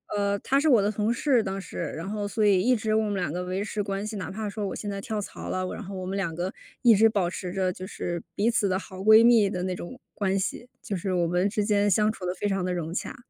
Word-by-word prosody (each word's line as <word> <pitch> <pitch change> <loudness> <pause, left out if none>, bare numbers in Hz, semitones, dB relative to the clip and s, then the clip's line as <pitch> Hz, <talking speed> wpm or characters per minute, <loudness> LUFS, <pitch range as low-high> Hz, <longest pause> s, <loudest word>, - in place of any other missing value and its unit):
呃， 200 0 +1
她 270 +7 +1
是 310 +2 +2
我 240 -7 +6
的 205 - +1
同 215 +1 0
事 245 +1 +2
当 195 -1 -3
时， 195 - -8 0.2
然 165 +4 -5
后 205 0 -3
所 215 +1 0
以 195 -3 +5
一 250 +5 +3
直 220 -1 -1
我 220 - +3
们 205 -1 -1
两 175 -6 -2
个 180 - -2
维 185 +2 -2
持 210 0 -3
关 200 0 -3
系。 215 0 -5
哪 185 - -5
怕 215 +2 -4
说 205 0 -3
我 - - -4
现 210 - -6
在 200 0 -4
跳 215 +1 -3
槽 205 - -7
了， 185 0 -1
我 - - -4
然 - - -6
后 195 0 -7
我 185 -1 -5
们 190 +1 -3
两 170 -5 -2
个 180 +3 -3 0.3
一 235 -2 +8
直 220 +2 +6
保 200 -5 +1
持 180 0 -5
着 185 -1 0
就 185 +1 -8
是 175 -4 -4
彼 220 +4 +2
此 210 -4 +1
的 185 - +1
好 190 -1 -9
闺 220 +3 +7
蜜 230 -4 +6
的 180 -2 -3
那 185 0 -2
种 175 +9 -8
关 195 -1 0
系， 200 +5 -3
就 205 - -3
是 185 +2 -3
我 175 -1 +2
们 180 +3 +1
之 210 0 -1
间 205 -1 +2
相 210 +2 +3
处 195 - -11
得 180 - -2
非 205 - -2
常 195 -2 0
地 180 - -1
融 170 -2 -3
洽。 190 - -4
200 Hz, 320 characters per minute, -26 LUFS, 185-215 Hz, 0.3 s, 一